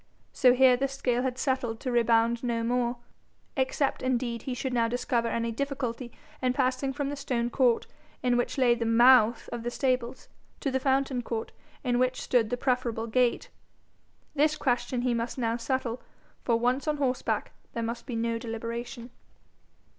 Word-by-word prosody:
So 250 Hz, -, +5 dB
here 255 Hz, -1 st, +6 dB
the 275 Hz, +2 st, 0 dB
scale 255 Hz, -3 st, -1 dB
had 255 Hz, -1 st, -2 dB
settled 260 Hz, -5 st, -1 dB
to 255 Hz, -, -2 dB
rebound 235 Hz, 0 st, +2 dB
no 235 Hz, -2 st, -1 dB
more 240 Hz, +1 st, 0 dB, 0.6 s
except 270 Hz, +1 st, 0 dB
indeed 245 Hz, -2 st, -1 dB
he 255 Hz, +1 st, -4 dB
should 260 Hz, +1 st, -3 dB
now 230 Hz, -1 st, +2 dB
discover 240 Hz, 0 st, 0 dB
any 230 Hz, 0 st, -1 dB
difficulty 250 Hz, -2 st, -3 dB, 0.3 s
in 255 Hz, -1 st, +1 dB
passing 260 Hz, +1 st, 0 dB
from 280 Hz, 0 st, -3 dB
the 290 Hz, -, -3 dB
stone 245 Hz, -4 st, -2 dB
court 245 Hz, -3 st, +2 dB, 0.4 s
in 250 Hz, -1 st, +3 dB
which 245 Hz, +3 st, -1 dB
lay 250 Hz, -3 st, +5 dB
the 230 Hz, -1 st, -2 dB
MOUTH 235 Hz, 0 st, +5 dB
of 240 Hz, -, -5 dB
the 240 Hz, -, -2 dB
stables, 255 Hz, -1 st, -1 dB, 0.3 s
to 275 Hz, -, -1 dB
the 265 Hz, -, +1 dB
fountain 270 Hz, -1 st, +1 dB
court 230 Hz, -1 st, -4 dB, 0.3 s
in 245 Hz, -2 st, +1 dB
which 255 Hz, 0 st, +1 dB
stood 235 Hz, -4 st, +2 dB
the 245 Hz, -, -1 dB
preferable 245 Hz, -3 st, -1 dB
gate. 245 Hz, +1 st, +1 dB, 0.8 s
This 305 Hz, +1 st, +2 dB
question 245 Hz, -2 st, 0 dB
he 250 Hz, -1 st, +1 dB
must 230 Hz, +2 st, -3 dB
now 230 Hz, -2 st, 0 dB
settle, 245 Hz, 0 st, -2 dB, 0.4 s
for 230 Hz, -2 st, +2 dB
once 250 Hz, +5 st, 0 dB
on 300 Hz, -1 st, +1 dB
horseback 260 Hz, -3 st, -1 dB, 0.2 s
there 230 Hz, -, -2 dB
must 235 Hz, +1 st, -4 dB
be 245 Hz, -, -4 dB
no 230 Hz, 0 st, -1 dB
deliberation. 235 Hz, +2 st, -6 dB
245 Hz, 170 wpm, -28 LUFS, 235-260 Hz, 0.8 s, here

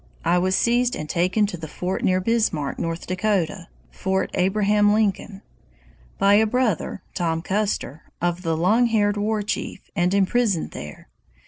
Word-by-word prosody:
I 175 Hz, +1 st, +3 dB
was 185 Hz, +1 st, +1 dB
seized 240 Hz, +2 st, +2 dB
and 155 Hz, -, -5 dB
taken 185 Hz, +6 st, +1 dB
to 200 Hz, -3 st, -5 dB
the 160 Hz, -1 st, -7 dB
fort 180 Hz, +5 st, -4 dB
near 185 Hz, 0 st, +2 dB
Bismarck, 185 Hz, -9 st, 0 dB
North 165 Hz, 0 st, -3 dB
Dakota 185 Hz, -2 st, -1 dB, 0.2 s
[Fort 190 Hz, 0 st, -1 dB
Abraham 205 Hz, +2 st, +2 dB
Lincoln], 205 Hz, -1 st, -1 dB, 0.7 s
by 200 Hz, +1 st, +4 dB
a 220 Hz, +2 st, +5 dB
brother 235 Hz, -5 st, -1 dB
[Tom 165 Hz, -2 st, -1 dB
Custer] 195 Hz, -6 st, -2 dB, 0.2 s
of 175 Hz, +1 st, -1 dB
the 165 Hz, -3 st, -1 dB
Long 215 Hz, +9 st, +3 dB
Haired 205 Hz, -3 st, +2 dB
War 210 Hz, +1 st, -1 dB
Chief, 205 Hz, -, -5 dB
and 180 Hz, -1 st, +1 dB
imprisoned 200 Hz, -2 st, +1 dB
there. 75 Hz, -3 st, -9 dB
190 Hz, 150 wpm, -23 LUFS, 175-215 Hz, 0.7 s, a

